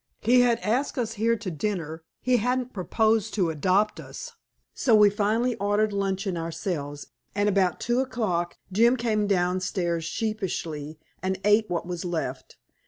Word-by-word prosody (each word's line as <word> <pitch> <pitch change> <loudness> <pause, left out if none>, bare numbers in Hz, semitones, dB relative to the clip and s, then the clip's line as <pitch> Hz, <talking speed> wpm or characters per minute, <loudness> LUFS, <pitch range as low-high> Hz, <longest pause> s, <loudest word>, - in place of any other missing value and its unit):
He 245 +3 +5
had 240 -2 +3
asked 250 +8 0
us 225 -3 -1
here 230 +2 +2
to 210 -4 -5
dinner; 165 -2 -3 0.2
he 250 -1 +3
hadn't 250 +2 -1
proposed 220 +3 +1
to 180 -6 +1
adopt 190 +7 +1
us." - - -8 0.4
So 235 -4 +3
we 210 -1 +7
finally 220 +4 +1
ordered 205 +1 +1
luncheon 195 -1 -1
ourselves, 160 -3 -4 0.3
and 205 0 +2
about 190 -3 +2
two 240 +1 0
o'clock 215 -10 -1
Jim 235 +6 +4
came 215 -3 0
downstairs 180 -2 0
sheepishly, 165 -7 -3 0.2
and 190 0 -1
ate 210 +1 +4
what 170 -1 -2
was 175 -1 -4
left. 155 -7 -4
205 Hz, 150 wpm, -26 LUFS, 175-225 Hz, 0.4 s, we